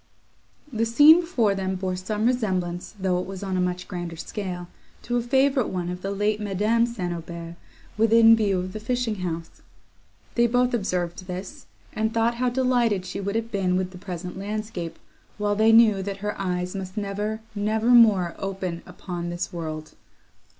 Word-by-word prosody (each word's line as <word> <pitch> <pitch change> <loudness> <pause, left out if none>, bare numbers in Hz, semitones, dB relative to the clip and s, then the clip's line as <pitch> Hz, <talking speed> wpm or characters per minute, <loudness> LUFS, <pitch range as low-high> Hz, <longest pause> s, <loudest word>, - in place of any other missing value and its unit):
The 225 0 0
scene 295 +8 +8
before 250 - +1
them 190 -1 -2
bore 185 0 -2
some 210 +4 -2
resemblance, 185 -8 -1
though 185 -1 +1
it 180 - -4
was 195 0 -7
on 190 -1 -2
a 185 - +1
much 180 0 -2
grander 175 -3 -5
scale, 180 0 -5 0.4
to 245 0 -1
a - - +1
favourite 265 +1 +2
one 180 -2 -3
of 180 0 -6
the 195 - -3
late 205 +2 0
Madame 210 +4 +2
St. 185 -7 -3
Aubert, 170 0 -7 0.5
within 225 0 +7
view 205 -4 +1
of 185 +1 -4
the 215 - -5
fishing 230 -1 -1
house. 170 -3 -5 0.7
They 235 0 +3
both 245 +1 +2
observed 180 -5 -2
this, 185 +1 -7 0.3
and 220 +1 0
thought 230 +1 +2
how 250 - +3
delighted 245 -6 +1
she 185 +2 -5
would 200 +2 -3
have 225 0 -2
been 185 -3 +1
with 185 0 -2
the 180 - -11
present 180 0 -6
landscape, 205 -4 -4 0.4
while 205 0 0
they 220 +2 +5
knew 225 -3 +6
that 200 0 -4
her 210 - 0
eyes 180 0 -2
must 190 +1 -6
never, 210 +2 -2
never 215 +2 0
more 215 -8 +6
open 190 -3 -4
upon 175 -2 -6
this 175 +1 -4
world. 155 -2 -5
200 Hz, 180 wpm, -25 LUFS, 180-225 Hz, 0.7 s, scene